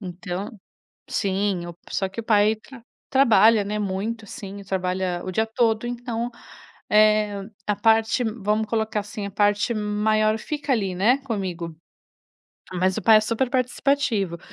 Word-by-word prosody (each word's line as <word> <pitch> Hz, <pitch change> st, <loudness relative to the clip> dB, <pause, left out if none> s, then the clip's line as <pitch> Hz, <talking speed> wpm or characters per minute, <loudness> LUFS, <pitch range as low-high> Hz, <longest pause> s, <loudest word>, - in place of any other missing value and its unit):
então, 180 Hz, +1 st, -5 dB, 0.6 s
sim, 195 Hz, -2 st, -1 dB
o 170 Hz, -, -8 dB
só 195 Hz, -1 st, -1 dB
que 230 Hz, +4 st, -6 dB
o -, -, -13 dB
pai 215 Hz, 0 st, +3 dB, 0.6 s
trabalha, 225 Hz, -5 st, +5 dB
né, 210 Hz, +1 st, -3 dB
muito 210 Hz, +3 st, -3 dB
assim 200 Hz, 0 st, -8 dB
e 200 Hz, -, -11 dB
trabalha 185 Hz, -1 st, -2 dB
o 185 Hz, -, -3 dB
dia 220 Hz, +4 st, +1 dB
todo, 225 Hz, 0 st, +1 dB
então, 240 Hz, 0 st, -4 dB, 0.6 s
eh, 210 Hz, -1 st, +4 dB, 0.3 s
a 210 Hz, -, +1 dB
parte 225 Hz, +3 st, +3 dB
vamos 215 Hz, -1 st, -1 dB
colocar 220 Hz, -1 st, -1 dB
assim, 205 Hz, 0 st, -6 dB
a 200 Hz, -, -8 dB
parte 205 Hz, +3 st, +2 dB
maior 215 Hz, +1 st, +1 dB
fica 295 Hz, +2 st, -4 dB
ali, 195 Hz, -5 st, -1 dB
né, 240 Hz, +9 st, +3 dB
comigo, 185 Hz, -10 st, -4 dB, 1.0 s
mas 185 Hz, +1 st, +1 dB
o -, -, -5 dB
pai 220 Hz, +2 st, +7 dB
é -, -, +1 dB
superparticipativo. 245 Hz, -4 st, 0 dB
210 Hz, 145 wpm, -24 LUFS, 195-225 Hz, 1.0 s, pai